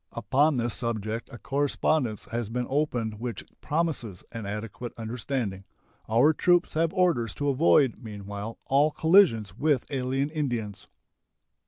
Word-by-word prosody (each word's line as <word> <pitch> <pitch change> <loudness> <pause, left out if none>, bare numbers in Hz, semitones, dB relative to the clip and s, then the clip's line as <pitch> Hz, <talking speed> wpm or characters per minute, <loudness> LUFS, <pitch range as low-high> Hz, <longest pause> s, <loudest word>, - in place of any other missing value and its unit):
Upon 135 +6 +2
this 120 -1 0
subject 115 -1 -3
a 120 - -8
correspondence 140 -3 0
has 115 -2 -2
been 125 +2 -2
opened 120 -7 -1
which 120 -1 -5 0.2
promises 145 - -2
an 115 -4 -6
adequate 105 +3 -6
understanding. 115 -3 -3 0.5
Our 125 +8 +5
troops 175 +2 +2
have 160 +1 +1
orders 175 - +1
to 145 0 -1
avoid 140 -2 +3
meanwhile 105 0 -7
all 140 +3 +4
collisions 155 - +4
with 145 0 +1
alien 135 +2 -1
Indians. 120 - -3
125 Hz, 130 wpm, -27 LUFS, 110-145 Hz, 0.5 s, Our